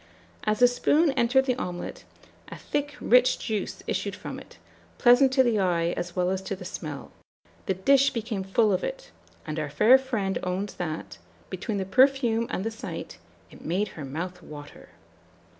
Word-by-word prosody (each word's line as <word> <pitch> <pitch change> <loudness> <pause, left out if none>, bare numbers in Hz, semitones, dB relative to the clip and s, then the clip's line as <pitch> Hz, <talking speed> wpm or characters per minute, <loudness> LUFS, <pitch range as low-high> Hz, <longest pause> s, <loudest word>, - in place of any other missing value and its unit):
"As 215 0 +1
the 245 - +7
spoon 290 +5 +2
entered 265 +1 +2
the 255 - +2
omelet, 180 -6 -6 0.4
a - - -9
thick 290 0 -3
rich 250 +1 +4
juice 215 -3 -4
issued - - -2
from - - -7
it, - - -15 0.4
pleasant 250 +2 +5
to 265 -1 +5
the 235 -4 +1
eye 175 -3 +1
as 175 0 -5
well 180 0 +1
as 190 0 -2
to 190 +1 -4
the 185 -1 -10
smell; 155 -5 -7 0.6
the 190 - +1
dish 275 +8 +4
became 225 -4 -4
full 205 +2 +2
of 185 - -1
it; - - -5 0.3
and 155 0 -4
our 150 -1 -3
fair 220 - +6
friend 225 -8 -2
owns 185 +3 -3
that, 160 -3 -5 0.3
between 215 -4 -3
the 190 - -2
perfume 235 +1 +3
and 185 - -3
the 225 - -2
sight, 225 - -7 0.3
it - - -14
made 195 +5 -1
her 155 - -9
mouth 175 +6 -5
water. 150 -2 -11
205 Hz, 175 wpm, -26 LUFS, 180-250 Hz, 0.6 s, the